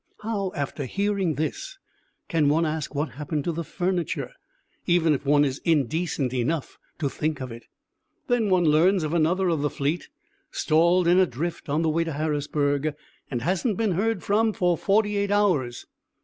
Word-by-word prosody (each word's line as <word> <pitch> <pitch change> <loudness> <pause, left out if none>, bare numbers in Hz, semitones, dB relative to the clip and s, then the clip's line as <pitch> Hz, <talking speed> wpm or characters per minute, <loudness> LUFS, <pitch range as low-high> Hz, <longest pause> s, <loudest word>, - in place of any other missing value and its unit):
How, 205 -4 -2
after 140 0 -3
hearing 195 0 0
this, - - -4 0.5
can 160 -5 +2
one 160 +3 +2
ask 155 -1 -3
what 150 +2 -1
happened 150 +1 -4
to 170 - -1
the 170 +1 -3
furniture, 180 - -2 0.6
even 170 -3 +3
if 140 0 -4
one 145 0 +5
is 135 0 -3
indecent 155 -3 0
enough 130 +4 -2 0.2
to 155 - -1
think 155 +2 -2
of 130 -2 -6
it? 115 +1 -10 0.6
Then 240 -4 +1
one 180 -2 +3
learns 165 +4 +4
of 155 +1 -2
another 175 +3 +2
of 165 -4 +1
the 145 - +1
fleet, 145 +6 -2 0.4
stalled 170 +3 +2
in 175 +2 +5
a 185 - +4
drift 165 +5 -5
on 150 +3 +1
the 160 - +2
way 165 +2 +1
to 165 -1 -4
Harrisburg, 145 -1 -1 0.3
and 120 -4 -3
hasn't 190 - 0
been 220 -3 +1
heard 205 +3 0
from 215 +2 +2
for 180 -4 +2
forty 205 +4 +1
eight 200 0 0
hours. 180 -13 +1
165 Hz, 175 wpm, -25 LUFS, 145-185 Hz, 0.6 s, one